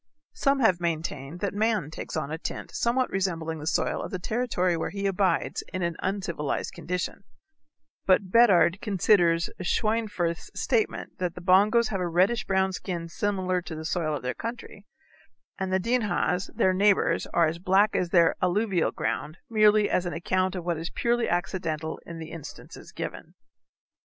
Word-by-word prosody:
Some 275 0 +1
have 185 -7 +3
maintained 160 -2 -3
that 200 - -1
man 210 -7 0
takes 160 - -6
on 150 -2 -3
a 160 - -4
tint - - -6
somewhat 250 +2 +1
resembling 165 -4 -2
the 150 - -7
soil - - 0
of - - -5
the 185 - -3
territory 185 -3 0
where 165 - -2
he 200 0 -4
abides 195 -1 0
in 185 -1 -3
an 170 -1 -1
uncivilized 185 -6 -2
condition, 180 +2 -4 0.8
but 190 0 +3
Beddard 200 -5 +5
considers 180 -4 +3
Schweinfurth's 205 -4 -1
statement 225 -4 -1
that 180 -2 -2
the 180 - -8
Bongos 210 +6 +4
have 195 -3 -2
a 180 - 0
reddish 190 +7 +2
brown 190 0 +1
skin 170 -3 -4
similar 185 -1 -1
to 160 -1 -7
the 160 0 -6
soil 160 -2 -1
of 140 - -6
their 125 - -1
country, 230 -3 -7 0.7
and 190 -1 -2
the 190 - +2
Dinhas, 210 -4 0
their 185 - +3
neighbors, 200 +1 +2
are 170 - +3
as 160 +2 -2
black 195 +4 +3
as 180 - 0
their 170 -2 +4
alluvial 185 -1 +1
ground, 155 +3 -3
merely 215 -1 +5
as 180 - 0
an 175 - -3
account 185 +3 0
of 175 -2 -5
what 170 -3 -1
is 165 +2 -4
purely 235 +5 0
accidental 165 -3 -2
in 170 - -7
the 160 0 -8
instances 165 -4 -10
given. - - -7
185 Hz, 170 wpm, -27 LUFS, 170-205 Hz, 0.8 s, Beddard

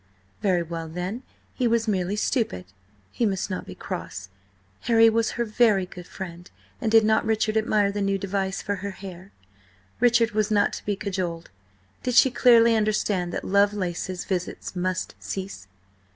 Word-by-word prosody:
Very 180 -4 +2
well, 165 0 -5
then, 180 +8 -4 0.3
he 250 - 0
was 230 0 +1
merely 190 -1 0
stupid! 210 - -1 0.5
He - - -2
must 195 -2 0
not 185 - -4
be - - -8
cross; 95 +1 -6 0.6
Harry 225 -1 +6
was 225 0 +1
her 235 - 0
very 210 -3 +3
good 180 -1 -11
friend, 175 -1 -8 0.3
and 225 -4 0
did 225 -1 +6
not 220 0 +3
Richard 220 0 0
admire 215 -2 +2
the 205 0 -3
new 195 0 +1
device 195 0 -2
for 205 -1 -2
her 200 +1 -4
hair? 190 0 -10 0.7
Richard 235 -1 +4
was 215 0 0
not 205 -1 +2
to - - -7
be 205 - +1
cajoled: 185 - -4 0.5
did 250 -1 -1
she 265 - +7
clearly 235 -2 +6
understand 210 -4 0
that - - -4
Lovelace's 185 -3 0
visits 180 0 -4
must 185 0 -2
cease? 190 - -6
200 Hz, 165 wpm, -25 LUFS, 185-220 Hz, 0.7 s, she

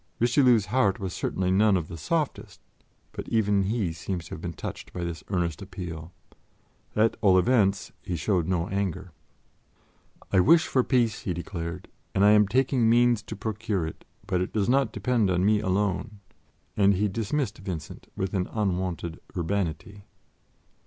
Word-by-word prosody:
Richelieu's 120 -2 +4
heart 100 -2 +1
was 95 -2 -4
certainly 95 -1 -1
none 100 +1 +4
of 80 -3 -3
the 85 - -8
softest, 150 - -2 0.5
but - - -7
even 105 -3 +2
he 100 -5 -1
seems 85 +1 -5
to - - -12
have 80 - -6
been 85 - -4
touched - - -7
by 90 - -4
this 85 -3 -5
earnest 85 -4 -1
appeal. 90 -4 -7 0.8
At 110 +1 +2
all 95 -3 +5
events, 100 -2 +2
he 90 - -4
showed 85 0 0
no 90 -2 0
anger. 95 -2 -3 1.2
"I 95 - +5
wish 160 - +5
for 130 - +2
peace," 120 -5 +1
he 90 - -3
declared, 85 0 -5 0.3
"and 100 - +4
I 105 - +7
am 105 -1 +5
taking 125 0 +2
means 120 -1 +4
to - - -8
procure 110 -5 -2
it, 80 - -8 0.2
but 90 - 0
it 90 - -2
does 105 -3 +1
not 130 -2 +2
depend 120 -6 +1
on 90 0 +1
me 105 0 +4
alone"; 100 +1 -1 0.6
and 100 -1 +4
he 105 +3 +1
dismissed 110 +3 -2
Vincent 90 -6 -7
with 95 0 -2
an 90 -2 0
unwonted 90 -5 -2 0.2
urbanity. 100 +2 -3
100 Hz, 165 wpm, -26 LUFS, 90-110 Hz, 1.2 s, I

